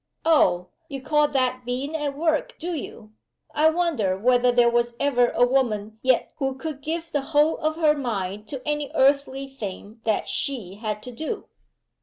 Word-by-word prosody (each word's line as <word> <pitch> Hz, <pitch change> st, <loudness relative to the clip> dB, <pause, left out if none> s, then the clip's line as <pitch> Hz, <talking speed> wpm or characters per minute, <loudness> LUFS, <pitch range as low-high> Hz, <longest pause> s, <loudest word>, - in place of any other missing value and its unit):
"Oh! 180 Hz, -, +3 dB, 0.2 s
you 275 Hz, -2 st, -5 dB
call 300 Hz, +2 st, +2 dB
that 255 Hz, -2 st, 0 dB
being 260 Hz, +5 st, -3 dB
at 295 Hz, -3 st, -2 dB
work, 315 Hz, -1 st, 0 dB
do 350 Hz, +2 st, -4 dB
you? 230 Hz, -8 st, -7 dB, 0.4 s
I 310 Hz, +2 st, +5 dB
wonder 315 Hz, -, 0 dB
whether 245 Hz, +3 st, +3 dB
there 240 Hz, -1 st, +4 dB
was 240 Hz, 0 st, +1 dB
ever 245 Hz, -4 st, +3 dB
a 245 Hz, -, +3 dB
woman 220 Hz, -5 st, 0 dB
yet 260 Hz, -2 st, +2 dB
who 270 Hz, -2 st, -1 dB
could 285 Hz, +1 st, -6 dB
give 330 Hz, +2 st, -4 dB
the 290 Hz, -, 0 dB
whole 295 Hz, +3 st, +2 dB
of 310 Hz, 0 st, 0 dB
her 315 Hz, -2 st, +4 dB
mind 210 Hz, -7 st, -3 dB
to 270 Hz, -1 st, -7 dB
any 295 Hz, -1 st, -1 dB
earthly 275 Hz, 0 st, +2 dB
thing 220 Hz, -3 st, -8 dB
that 220 Hz, -2 st, 0 dB
she 230 Hz, -10 st, -3 dB
had 215 Hz, -1 st, -4 dB
to 250 Hz, -, -7 dB
do?" 315 Hz, -, -5 dB
265 Hz, 175 wpm, -24 LUFS, 235-300 Hz, 0.4 s, I